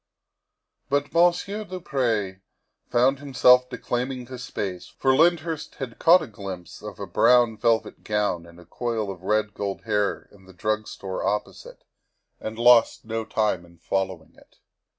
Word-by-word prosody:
But 145 Hz, 0 st, 0 dB
Monsieur 175 Hz, +5 st, +2 dB
du 185 Hz, -3 st, -7 dB
Pre 115 Hz, -, -1 dB, 0.5 s
found 130 Hz, +3 st, +3 dB
himself 125 Hz, -2 st, +4 dB
declaiming 125 Hz, +1 st, -3 dB
to 130 Hz, 0 st, -9 dB
space, 95 Hz, -7 st, -5 dB
for 135 Hz, -1 st, +1 dB
Lyndhurst 165 Hz, 0 st, +1 dB
had 130 Hz, -4 st, -7 dB
caught 170 Hz, +1 st, +6 dB
a -, -, -7 dB
glimpse 100 Hz, -5 st, -8 dB
of -, -, -9 dB
a -, -, -4 dB
brown 120 Hz, -1 st, +4 dB
velvet 115 Hz, +1 st, 0 dB
gown 105 Hz, -5 st, -1 dB
and 85 Hz, +1 st, -15 dB
a 85 Hz, -, -15 dB
coil 115 Hz, -4 st, -3 dB
of 90 Hz, -2 st, -10 dB
red 105 Hz, +2 st, 0 dB
gold 100 Hz, -1 st, -4 dB
hair 105 Hz, -2 st, -1 dB
in 95 Hz, -2 st, -19 dB
the 95 Hz, -, -15 dB
drug 110 Hz, +3 st, -2 dB
store 95 Hz, -1 st, -5 dB
opposite, 105 Hz, +1 st, -4 dB, 0.6 s
and 110 Hz, 0 st, -6 dB
lost 120 Hz, -1 st, +5 dB
no 115 Hz, 0 st, -3 dB
time 105 Hz, -6 st, 0 dB
in 85 Hz, 0 st, -19 dB
following 95 Hz, -2 st, -3 dB
it. -, -, -23 dB
115 Hz, 155 wpm, -25 LUFS, 100-130 Hz, 0.6 s, caught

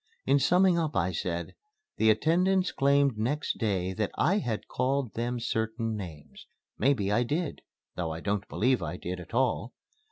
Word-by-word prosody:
In 140 Hz, +2 st, +4 dB
summing 180 Hz, +5 st, +4 dB
up 155 Hz, -2 st, -2 dB
I 95 Hz, 0 st, +1 dB
said, 85 Hz, 0 st, -3 dB, 0.4 s
"The 110 Hz, -, +4 dB
attendants 180 Hz, -, +3 dB
claimed 140 Hz, -4 st, +2 dB
next 145 Hz, +7 st, -1 dB
day 95 Hz, -4 st, 0 dB
that 105 Hz, +2 st, -1 dB
I 195 Hz, +5 st, +2 dB
had 115 Hz, -, -3 dB
called 130 Hz, -2 st, -1 dB
them 120 Hz, +1 st, -2 dB
certain 115 Hz, -1 st, -2 dB
names. 80 Hz, -8 st, -9 dB, 0.3 s
Maybe 110 Hz, -6 st, +2 dB
I 105 Hz, -, +3 dB
did 150 Hz, +6 st, -2 dB, 0.3 s
though 90 Hz, -2 st, -2 dB
I 80 Hz, -, -5 dB
don't 100 Hz, +1 st, -2 dB
believe 125 Hz, +3 st, +1 dB
I 85 Hz, +4 st, -4 dB
did 90 Hz, +1 st, -5 dB
at 90 Hz, +6 st, -9 dB
all. 125 Hz, -1 st, +1 dB
115 Hz, 165 wpm, -29 LUFS, 100-140 Hz, 0.4 s, In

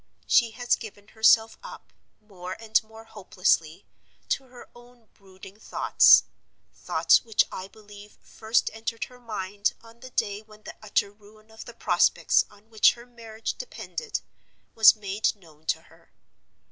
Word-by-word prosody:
She 235 Hz, -2 st, +4 dB
has 245 Hz, -1 st, +1 dB
given 205 Hz, -2 st, -12 dB
herself 220 Hz, 0 st, +3 dB
up, -, -, -12 dB, 0.3 s
more 185 Hz, -4 st, -9 dB
and 220 Hz, -1 st, +1 dB
more 220 Hz, +1 st, -15 dB
hopelessly, 185 Hz, -5 st, -1 dB, 0.4 s
to 270 Hz, -, -1 dB
her 250 Hz, -1 st, -15 dB
own 240 Hz, -2 st, -19 dB
brooding 190 Hz, +1 st, -16 dB
thoughts; -, -, +5 dB, 0.5 s
thoughts -, -, +2 dB
which 225 Hz, -2 st, +2 dB
I 185 Hz, -, -7 dB
believe 205 Hz, 0 st, -16 dB
first 220 Hz, +1 st, -1 dB
entered 225 Hz, +1 st, -5 dB
her 250 Hz, 0 st, -11 dB
mind 205 Hz, -3 st, -3 dB
on 230 Hz, 0 st, -17 dB
the 255 Hz, -, -11 dB
day 205 Hz, -4 st, -2 dB
when 215 Hz, 0 st, -19 dB
the -, -, -10 dB
utter 205 Hz, -1 st, -1 dB
ruin 215 Hz, +1 st, -21 dB
of 220 Hz, -, -11 dB
the -, -, -12 dB
prospects -, -, +2 dB
on 210 Hz, +2 st, -23 dB
which 220 Hz, -, +5 dB
her 235 Hz, 0 st, -14 dB
marriage 230 Hz, -2 st, -7 dB
depended 475 Hz, -2 st, -6 dB, 0.5 s
was 220 Hz, 0 st, +7 dB
made 205 Hz, 0 st, -2 dB
known 160 Hz, -5 st, -21 dB
to -, -, -1 dB
her. -, -, -23 dB
220 Hz, 150 wpm, -26 LUFS, 205-230 Hz, 0.5 s, was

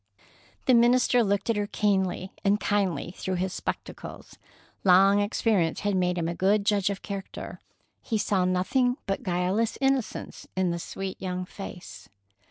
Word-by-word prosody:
The 260 Hz, -, +5 dB
minister 240 Hz, +1 st, +5 dB
looked 200 Hz, -1 st, 0 dB
at -, -, -1 dB
her 205 Hz, 0 st, -1 dB
keenly 190 Hz, -3 st, 0 dB
and 205 Hz, +1 st, +3 dB
kindly 195 Hz, -5 st, 0 dB
through 185 Hz, -, -2 dB
his 185 Hz, +1 st, -2 dB
spectacles. -, -, -6 dB, 0.4 s
Long 195 Hz, +2 st, +6 dB
experience 205 Hz, -4 st, +1 dB
had 205 Hz, -1 st, 0 dB
made 180 Hz, -1 st, +1 dB
him 165 Hz, -1 st, -1 dB
a 170 Hz, -, -1 dB
good 200 Hz, +3 st, +2 dB
judge 205 Hz, -2 st, +2 dB
of 200 Hz, -1 st, -4 dB
character. 200 Hz, -2 st, -6 dB, 0.4 s
He 225 Hz, -, -1 dB
saw 200 Hz, -3 st, +1 dB
nothing 245 Hz, +8 st, +1 dB
but 195 Hz, -, -2 dB
guileless 185 Hz, +5 st, 0 dB
innocence 270 Hz, -4 st, -1 dB
in 185 Hz, -2 st, +1 dB
the 170 Hz, -, -3 dB
sweet 190 Hz, +2 st, -6 dB
young 185 Hz, -1 st, -3 dB
face. 185 Hz, -2 st, -9 dB
195 Hz, 155 wpm, -27 LUFS, 185-210 Hz, 0.4 s, Long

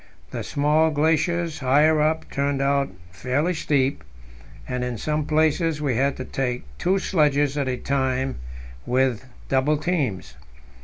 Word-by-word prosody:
The -, -, -4 dB
small 150 Hz, +3 st, +2 dB
glaciers 160 Hz, +2 st, 0 dB
higher 150 Hz, +4 st, +4 dB
up 160 Hz, +1 st, 0 dB
turned 140 Hz, 0 st, 0 dB
out 140 Hz, 0 st, +1 dB, 0.2 s
fairly 130 Hz, -, -1 dB
steep, 140 Hz, -, 0 dB, 0.6 s
and 125 Hz, -1 st, -2 dB
in 125 Hz, -2 st, -3 dB
some 150 Hz, +4 st, -2 dB
places 155 Hz, 0 st, +1 dB
we 140 Hz, -5 st, 0 dB
had 135 Hz, +3 st, +1 dB
to 130 Hz, -, -5 dB
take 125 Hz, -2 st, -2 dB, 0.2 s
two 190 Hz, +2 st, +2 dB
sledges 145 Hz, -6 st, +2 dB
at 140 Hz, -2 st, -1 dB
a 125 Hz, -1 st, -1 dB
time 130 Hz, 0 st, -1 dB, 0.5 s
with 130 Hz, -2 st, +1 dB, 0.2 s
double 135 Hz, +3 st, +2 dB
teams. 145 Hz, -, -2 dB
145 Hz, 140 wpm, -23 LUFS, 130-155 Hz, 0.6 s, higher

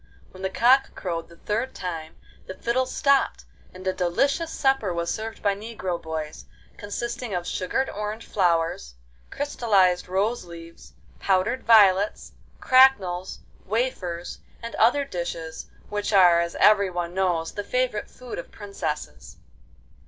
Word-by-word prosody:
When 185 Hz, -, -12 dB
the 190 Hz, -, -1 dB
cock 255 Hz, +7 st, +3 dB
crowed 170 Hz, -3 st, -4 dB
the 170 Hz, -, -15 dB
third 225 Hz, +9 st, -3 dB
time 165 Hz, -3 st, -6 dB, 0.3 s
the 190 Hz, -, -7 dB
fiddles 255 Hz, +5 st, -1 dB
stopped, 280 Hz, -1 st, +2 dB, 0.3 s
and 185 Hz, 0 st, -12 dB
a 185 Hz, -, +1 dB
delicious 275 Hz, -, 0 dB
supper 270 Hz, -8 st, +1 dB
was 170 Hz, 0 st, -2 dB
served 220 Hz, +1 st, -6 dB
by 200 Hz, -1 st, +3 dB
negro 195 Hz, -4 st, -5 dB
boys, 160 Hz, -1 st, -6 dB, 0.3 s
consisting 235 Hz, +1 st, -4 dB
of 175 Hz, -1 st, -3 dB
sugared 190 Hz, +10 st, -1 dB
orange 210 Hz, +2 st, -5 dB
flowers, 165 Hz, -, 0 dB, 0.3 s
crystallised 200 Hz, -10 st, +1 dB
rose 200 Hz, +6 st, 0 dB
leaves, 170 Hz, -1 st, -12 dB, 0.3 s
powdered 195 Hz, +6 st, +1 dB
violets, 205 Hz, -3 st, +4 dB, 0.3 s
cracknels, 205 Hz, -9 st, +3 dB, 0.3 s
wafers, 185 Hz, -6 st, -2 dB, 0.2 s
and 230 Hz, -, -6 dB
other 280 Hz, +6 st, +3 dB
dishes, 170 Hz, -6 st, -5 dB, 0.2 s
which 205 Hz, 0 st, -2 dB
are, 180 Hz, -4 st, +6 dB
as 170 Hz, 0 st, -2 dB
everyone 185 Hz, -5 st, +3 dB
knows, 180 Hz, -3 st, 0 dB
the 205 Hz, -, -5 dB
favourite 250 Hz, -1 st, -1 dB
food 250 Hz, -6 st, -8 dB
of -, -, -8 dB
princesses. 155 Hz, -, -6 dB
195 Hz, 130 wpm, -25 LUFS, 175-230 Hz, 0.3 s, are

